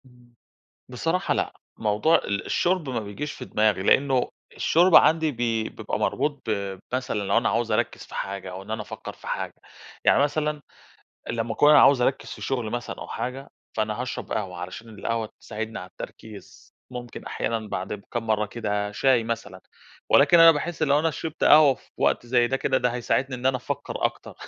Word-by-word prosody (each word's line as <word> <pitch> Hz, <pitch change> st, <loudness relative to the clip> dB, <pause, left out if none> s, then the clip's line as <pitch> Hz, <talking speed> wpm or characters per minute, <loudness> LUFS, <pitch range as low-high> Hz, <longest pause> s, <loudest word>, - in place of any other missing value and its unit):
إمم، 125 Hz, -1 st, -22 dB, 0.6 s
بصراحة 165 Hz, +9 st, -1 dB
لأ، -, -, -1 dB, 0.2 s
موضوع 110 Hz, +9 st, +3 dB
ال 100 Hz, 0 st, -2 dB
الشُرب 175 Hz, -4 st, 0 dB
ما 125 Hz, -3 st, -1 dB
بييجيش 105 Hz, +8 st, -5 dB
في -, -, -8 dB
دماغي، 105 Hz, -3 st, +1 dB
لأنه 130 Hz, +4 st, +3 dB, 0.3 s
الشُرب 175 Hz, +2 st, +3 dB
عندي 160 Hz, -1 st, +5 dB
بي 115 Hz, -2 st, -1 dB
بيبقى -, -, -4 dB
مربوط 145 Hz, -3 st, -1 dB
ب 100 Hz, -2 st, -2 dB, 0.2 s
مثلًا 130 Hz, -3 st, -1 dB
لو 100 Hz, -1 st, +2 dB
أنا -, -, +1 dB
عايِز -, -, 0 dB
أركّز -, -, -1 dB
في -, -, -13 dB
حاجة 95 Hz, -1 st, -4 dB
أو 95 Hz, +1 st, -7 dB
إن 100 Hz, -, -12 dB
أنا 110 Hz, 0 st, -2 dB
أفكّر -, -, -8 dB
في -, -, -16 dB
حاجة. -, -, -3 dB, 0.5 s
يعني -, -, +5 dB
مثلًا 150 Hz, 0 st, -1 dB, 0.7 s
لمّا 115 Hz, -1 st, -2 dB
أكون 145 Hz, +6 st, +5 dB
أنا 150 Hz, -, +8 dB
عايِز 140 Hz, -2 st, +6 dB
أركّز 130 Hz, +2 st, 0 dB
في -, -, -8 dB
شُغل 125 Hz, -5 st, -2 dB
مثلًا 120 Hz, +1 st, -4 dB
أو -, -, -7 dB
حاجة، 130 Hz, +2 st, -5 dB, 0.3 s
فأنا 110 Hz, +1 st, -1 dB
هاشرَب 125 Hz, -, -5 dB
قهوة 95 Hz, -5 st, -3 dB
علشان 95 Hz, +6 st, -7 dB
القهوة 110 Hz, +1 st, -3 dB
تساعدني 110 Hz, +1 st, -5 dB
على 90 Hz, -, -8 dB
التركيز، 105 Hz, +2 st, -11 dB, 0.2 s
ممكن 120 Hz, -2 st, -8 dB
أحيانًا 115 Hz, -2 st, -3 dB
بعد 100 Hz, +2 st, -4 dB
كام 120 Hz, -2 st, -3 dB
مرَّة 105 Hz, -1 st, +1 dB
كده 105 Hz, -2 st, -3 dB
شاي 125 Hz, +1 st, +3 dB
مثلًا. 110 Hz, -5 st, -5 dB, 0.5 s
ولكن 175 Hz, -, +6 dB
أنا 165 Hz, 0 st, +10 dB
باحس 160 Hz, +1 st, -2 dB
لو 145 Hz, -1 st, +4 dB
أنا 165 Hz, +2 st, +1 dB
شربت 160 Hz, +1 st, -4 dB
قهوة 150 Hz, -3 st, +7 dB
في -, -, -24 dB
وقت -, -, +1 dB
زي 120 Hz, 0 st, +3 dB
ده، 135 Hz, -, 0 dB
كده 135 Hz, 0 st, +1 dB
ده 125 Hz, -, +1 dB
هيساعدني 130 Hz, +2 st, 0 dB
إن 125 Hz, +1 st, -3 dB
أنا 130 Hz, -1 st, +3 dB
أفكّر -, -, -4 dB
أكتَر -, -, -3 dB
120 Hz, 185 wpm, -25 LUFS, 105-140 Hz, 0.7 s, أنا